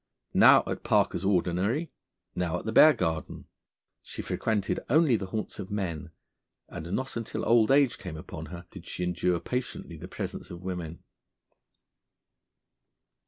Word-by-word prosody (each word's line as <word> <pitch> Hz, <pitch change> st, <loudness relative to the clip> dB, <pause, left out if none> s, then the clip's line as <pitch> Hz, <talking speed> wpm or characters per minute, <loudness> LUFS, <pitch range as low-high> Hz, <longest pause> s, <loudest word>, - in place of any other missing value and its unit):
Now -, -, +7 dB
at -, -, -4 dB
Parker's 85 Hz, -, +2 dB
Ordinary, 100 Hz, -, +1 dB, 0.4 s
now 90 Hz, -1 st, -1 dB
at -, -, -8 dB
the 110 Hz, -, -1 dB
Bear 155 Hz, +7 st, +8 dB
Garden, 80 Hz, -, -3 dB, 0.6 s
she -, -, -7 dB
frequented 105 Hz, -3 st, -1 dB
only 150 Hz, -1 st, +4 dB
the 100 Hz, -3 st, -3 dB
haunts 105 Hz, +3 st, -4 dB
of 95 Hz, -, -6 dB
men, 90 Hz, -7 st, -3 dB, 0.6 s
and 85 Hz, +3 st, -7 dB
not 130 Hz, +4 st, -2 dB
until 115 Hz, -2 st, -4 dB
old 115 Hz, -2 st, +4 dB
age 135 Hz, -2 st, +4 dB
came 90 Hz, -8 st, -7 dB
upon 80 Hz, -, -8 dB
her 90 Hz, 0 st, -9 dB
did 90 Hz, -3 st, -11 dB
she 90 Hz, -, -4 dB
endure 90 Hz, 0 st, 0 dB
patiently 125 Hz, -9 st, -4 dB
the -, -, -9 dB
presence -, -, -6 dB
of 85 Hz, +1 st, -9 dB
women. 90 Hz, -3 st, -5 dB
95 Hz, 145 wpm, -28 LUFS, 85-115 Hz, 0.6 s, Bear